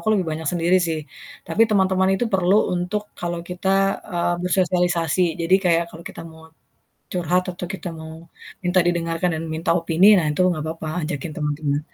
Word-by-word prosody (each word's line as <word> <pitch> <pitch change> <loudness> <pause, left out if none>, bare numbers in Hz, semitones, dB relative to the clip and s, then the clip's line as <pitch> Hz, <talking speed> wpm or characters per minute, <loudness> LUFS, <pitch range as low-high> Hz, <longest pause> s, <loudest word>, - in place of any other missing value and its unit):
aku 220 - 0
lebih 185 -5 0
banyak 155 0 -4
sendiri 175 +1 +2
sih, 160 -1 -1 0.5
tapi 225 - +2
teman-teman 190 -2 +3
itu 195 - 0
perlu 185 0 +3 0.2
untuk 180 +4 -2 0.2
kalau 175 0 -3
kita, 180 +1 -3 0.4
eee, 175 0 0
bersosialisasi. 180 -2 +1 0.2
Jadi 170 +3 +3
kayak 170 -1 +3
kalau 170 0 -12
kita - - -10
mau 160 0 -15 0.7
curhat 180 0 +1
atau 175 - -6
kita 190 -1 -6
mau 160 0 -8 0.5
minta 180 +1 +3
didengarkan 170 0 0
dan 160 - -5
minta 160 - -3
opini, 170 +2 +2
nah 170 - +1
itu 150 +4 0
enggak 155 -3 -2
papa 165 -1 -7 0.2
ajakin 155 0 -4
teman-teman 145 -1 -1
175 Hz, 170 wpm, -22 LUFS, 165-185 Hz, 0.7 s, teman-teman